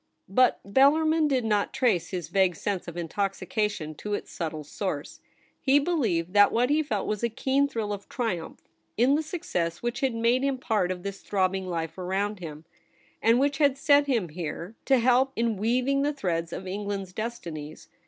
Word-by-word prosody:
But 250 +6 +3
Bellarmin 305 +8 +4
did 260 -5 +1
not 210 -2 0
trace 225 -10 +1
his 180 -3 -4
vague 190 -3 +2
sense 195 +1 -3
of 170 0 -7
intoxication 195 0 -2
to 210 0 -2
its - - -7
subtle 155 -2 -4
source. 150 -1 -4 0.4
He 275 +1 +4
be 290 +5 +1
lieved 180 - 0
that 205 -1 +6
what 245 +4 +2
he 305 +1 +3
felt 220 -9 -2
was 210 -1 -2
a 235 - +1
keen 270 +5 +1
thrill 220 -6 -3
of 200 -1 -8
triumph 200 -10 -3 0.3
in 250 +5 +4
the 300 - +2
success 210 - -3
which 240 +2 -2
had 265 -4 0
made 235 +2 +2
him 275 -1 +1
part 220 -7 0
of 180 -1 -5
this 200 -1 -5
throbbing 190 -1 0
life 165 -1 -4
around 195 +3 -1
him, 155 -2 -8 0.6
and 230 +2 +4
which 280 0 +1
had 280 -3 +3
set 285 0 +4
him 230 -10 0
here 170 +4 -5
to 270 - +4
help 255 +2 +3
in 230 -1 +1
weaving 250 +7 +1
the 290 +1 +1
threads 170 - -2
of 185 - -6
England's 195 -1 -4
destinies. 170 -9 -6
210 Hz, 185 wpm, -27 LUFS, 180-265 Hz, 0.6 s, that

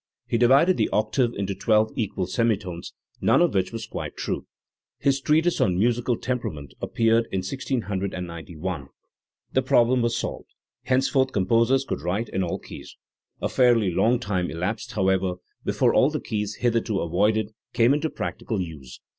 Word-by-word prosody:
He 115 - 0
divided 135 +9 +5
the - - +1
octave 115 +3 +1
into 100 0 -2
twelve 110 +2 +2
equal 100 -5 -2
semitones, 95 -4 -2 0.3
none - - +4
of 175 0 +3
which 95 -2 0
was 115 -1 -5
quite - - -6
true. - - -3 0.5
His 135 -1 +1
treatise 160 +5 +2
on 90 -1 +2
Musical 120 +3 +1
Temperament 80 - -4
appeared 115 0 +2
in 95 - -1
1691. 95 - -4 0.7
The - - +3
problem 120 +1 +3
was 120 0 0
solved; - - -5 0.4
henceforth 130 +1 +2
composers 115 +7 +2
could - - -3
write 95 +8 -2
in 95 - -1
all 85 -2 -1
keys. - - -11 0.5
A - - +2
fairly 120 -6 +3
long 115 +8 +3
time 95 -6 -1
elapsed, 90 +7 -3
however, 95 -2 +1 0.3
before - - +2
all - - +5
the - - -3
keys 105 -1 -3
hitherto 115 -4 +1
avoided 105 +5 +1 0.2
came 120 +3 +4
into 150 +2 0
practical 110 -7 -4
use. 80 -8 -7
110 Hz, 155 wpm, -25 LUFS, 95-120 Hz, 0.7 s, divided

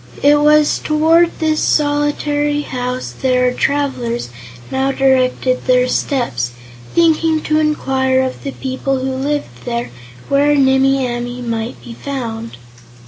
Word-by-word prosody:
It 290 +1 +5
was 300 0 +4
toward 325 +3 +3
this 315 -1 0
solitary 295 0 +1
house 250 -1 -4
that 255 -1 +2
our 250 0 +2
travelers 250 - -1 0.4
now 265 +1 0
directed 260 -1 +1
their 250 0 +4
steps, 125 - -1 0.4
thinking 325 -1 +3
to 310 0 +1
inquire 265 -4 +1
of 260 0 -3
the 275 - -4
people 265 +1 -2
who 260 +1 -2
lived 265 - -3
there 120 +1 -3 0.4
where 285 +1 +3
Nimmie 270 -1 +3
Amee 245 +1 -4
might 230 0 -4
be 235 - -9
found. 230 - -6
265 Hz, 130 wpm, -17 LUFS, 250-295 Hz, 0.4 s, It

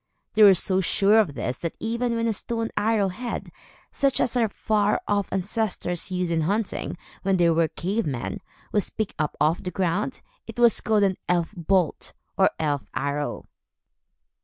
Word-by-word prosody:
They 220 - +2
were 200 -2 +9
so 190 +1 +1
sure 200 +4 +4
of 170 -10 +1
this, 125 +3 -3
that 170 - -4
even 235 +1 -1
when 230 0 0
a 225 - +1
stone 225 +2 -3
arrow 210 -2 +2
head 235 +6 -5 0.4
such 275 -1 +1
as 250 - +1
our 230 -3 +2
far 210 0 +1
off 205 -1 0
ancestors 190 -3 -2
used 180 -2 -1
in 165 -1 +1
hunting, 200 +3 -2 0.2
when 195 0 +1
they 170 -1 +4
were 165 0 +3
cave 195 +4 -2
men 130 -4 -3 0.3
was 205 - +1
picked 220 -2 -3
up 150 -1 -1
off 155 +4 +2
the 180 - -4
ground, 185 +7 -1 0.2
it - - -9
was 235 -1 +4
called 215 -2 +2
an 190 -2 +2
"elf 175 +1 +1
bolt," 180 -1 0 0.2
or - - +4
"elf 145 -3 -2
arrow." 145 +1 -2
195 Hz, 175 wpm, -25 LUFS, 170-220 Hz, 0.4 s, were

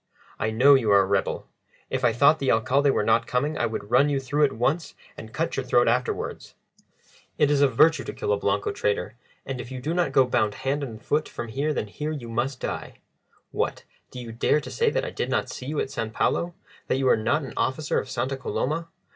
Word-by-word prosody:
"I 110 - 0
know 130 +6 +6
you 125 -6 +3
are 100 -1 +7
a - - +1
rebel. 95 0 -1 0.5
If - - -2
I - - +4
thought 140 +7 +4
the 135 - +1
Alcalde 135 +5 +2
were 135 - +2
not 115 +2 +2
coming 145 +5 0
I 120 - 0
would 110 -1 -6
run 135 +4 +5
you 140 -1 +1
through 145 +3 +2
at 135 - -1
once 135 +9 -1 0.2
and 110 - -10
cut 160 +8 -2
your 135 - -1
throat 120 -1 +3
afterwards. 125 +2 -2 0.8
It 145 - +3
is 145 -1 +3
a 140 - +6
virtue 155 +6 +4
to - - -5
kill 105 - -1
a - - +1
Blanco 100 0 0
traitor, 100 0 -1 0.3
and 130 -2 -4
if 120 +2 -10
you 130 - -5
do 150 +6 -2
not 170 -5 +1
go 135 -1 +5
bound 110 -4 0
hand 135 +2 -2
and 115 -6 -6
foot 150 +6 -1
from 120 - -6
here 140 +6 -1
then 135 - -2
here 150 +9 -5
you 130 -7 -6
must 125 +3 -2
die. - - -5 0.5
What, - - -2 0.3
do 125 - -9
you 120 -2 -7
dare 115 +6 +2
to - - -9
say 460 0 +2
that - - -1
I - - -5
did - - -3
not - - 0
see 125 - -7
you 150 +1 -2
at - - -2
San 115 - -3
Paulo 170 +9 0 0.3
that - - +1
you 135 -1 +1
are - - +6
not 115 +8 0
an 135 - -7
officer 135 +2 0
of - - -7
Santa 135 +1 -2
Coloma? 155 +5 -2
130 Hz, 240 wpm, -25 LUFS, 115-145 Hz, 0.8 s, are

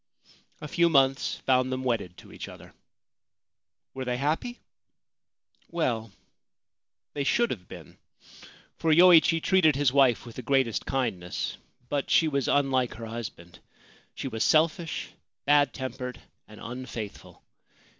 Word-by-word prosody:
A 150 - -6
few 170 +3 +2
months 135 -3 +2
found 130 0 +2
them 130 0 -3
wedded 110 -8 -2
to - - -14
each - - -7
other. - - -13 1.2
Were 130 - -5
they 125 -1 -2
happy? 160 - -2 1.1
Well, 120 -10 -2 1.0
they 145 - -2
should 235 +11 +2
have 90 -6 -6
been, - - -12 0.8
for 160 - +1
Yoichi 165 0 +6
treated 175 -6 +4
his 140 -2 +2
wife 135 -5 +3
with 115 - -11
the - - -4
greatest 130 -2 0
kindness; 110 -10 -2 0.3
but 145 0 -2
she 165 - +4
was 140 -4 -1
unlike 135 -3 +1
her 115 - -7
husband. 105 -7 -8 0.6
She - - -5
was 110 -3 -2
selfish, 160 +1 +1 0.4
bad 145 -2 +4
tempered, 130 -1 -6 0.3
and 105 0 -14
unfaithful. 115 -3 -8
130 Hz, 130 wpm, -27 LUFS, 120-150 Hz, 1.2 s, Yoichi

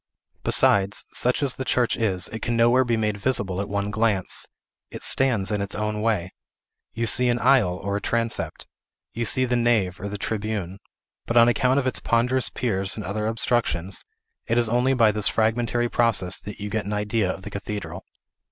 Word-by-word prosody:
Besides, 100 0 +3
such 125 +3 +1
as 135 -3 +1
the 130 - -5
church 125 -2 +1
is, 95 -5 -1
it 115 - -7
can 120 -1 -1
nowhere 120 +3 +4
be 120 -2 0
made 105 -2 -1
visible 100 -4 -1
at 100 - -5
one 100 0 -2
glance. 105 -3 0 0.4
It - - -9
stands 115 -7 +1
in 105 -1 -1
its 100 -1 -4
own 105 0 -2
way. 105 -5 -1 0.6
You 115 +1 -1
see 120 +3 +4
an 120 - +1
aisle, 120 -8 +3
or 100 +1 -3
a - - -5
transept; 115 -1 -2 0.5
you 115 +1 -2
see 130 +4 +2
the 125 0 0
nave, 115 -7 +1
or 100 - -5
the 105 - -5
tribune; 100 -3 -4 0.5
but, 115 - 0
on 115 0 +7
account 125 +2 +2
of 140 - +1
its 130 - -1
ponderous 125 +2 +1
piers 95 -6 -1
and 105 - -6
other 105 +3 -2
obstructions, 110 -6 0 0.4
it 115 - +1
is 120 -1 +3
only 125 +3 +2
by 115 -3 +4
this 105 -1 0
fragmentary 120 +2 +1
process 110 -7 +1
that 105 +1 -9
you 105 0 -5
get 110 -2 -2
an 105 - -3
idea 105 -1 0
of 95 - -9
the 105 - -8
cathedral. 100 -3 -6
110 Hz, 195 wpm, -24 LUFS, 100-120 Hz, 0.6 s, on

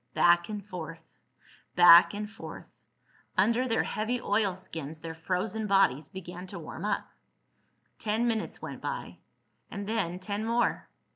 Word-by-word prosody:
Back 175 +1 +4
and 210 -2 -5
forth... 165 -4 -7 0.7
back 175 -1 +9
and 210 0 -3
forth.... 220 - -11 0.6
Under 230 +7 +3
their 225 -2 +2
heavy 220 +4 -2
oilskins 185 - -2
their 165 0 -6
frozen 185 +6 -2
bodies 195 -8 +3
began 180 -1 -8
to 195 - -6
warm 165 +2 -7
up. 210 - -1 0.9
Ten 220 +2 0
minutes 225 -2 -2
went - - -6
by, - - -5 0.5
and 200 0 -5
then 200 -6 -1
ten 200 +3 -3
more. 235 +2 0
195 Hz, 135 wpm, -29 LUFS, 175-215 Hz, 0.9 s, back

